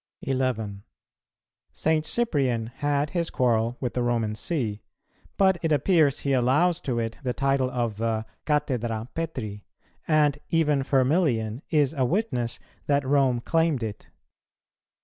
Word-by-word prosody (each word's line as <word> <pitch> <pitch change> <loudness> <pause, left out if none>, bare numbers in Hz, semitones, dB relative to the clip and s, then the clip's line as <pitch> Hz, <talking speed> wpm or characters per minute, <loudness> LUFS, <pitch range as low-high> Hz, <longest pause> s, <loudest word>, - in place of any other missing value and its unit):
11. 125 -7 -1 0.9
St. 155 0 +1
Cyprian 135 - 0
had 145 0 0
his 170 -2 -1
quarrel 120 -1 +1
with 125 -3 -3
the 125 - -1
Roman 115 -3 0
See, 110 -5 -2 0.6
but 190 -2 +4
it 165 - 0
appears 150 -1 +3
he 140 - 0
allows 140 +8 +2
to 125 -3 -2
it 115 -1 -3
the 125 -3 -2
title 135 -2 +1
of 120 -4 -2
the 110 0 -1 0.2
"Cathedra 125 -6 -1
Petri," 120 -11 -4 0.4
and 150 -2 +3
even 150 -4 +2
Firmilian 130 -4 +1
is 145 -3 +2
a 135 -4 0
witness 125 - 0 0.3
that 140 -1 +2
Rome 135 -3 +2
claimed 160 -4 +1
it. 105 -2 -6
130 Hz, 130 wpm, -26 LUFS, 120-150 Hz, 0.9 s, but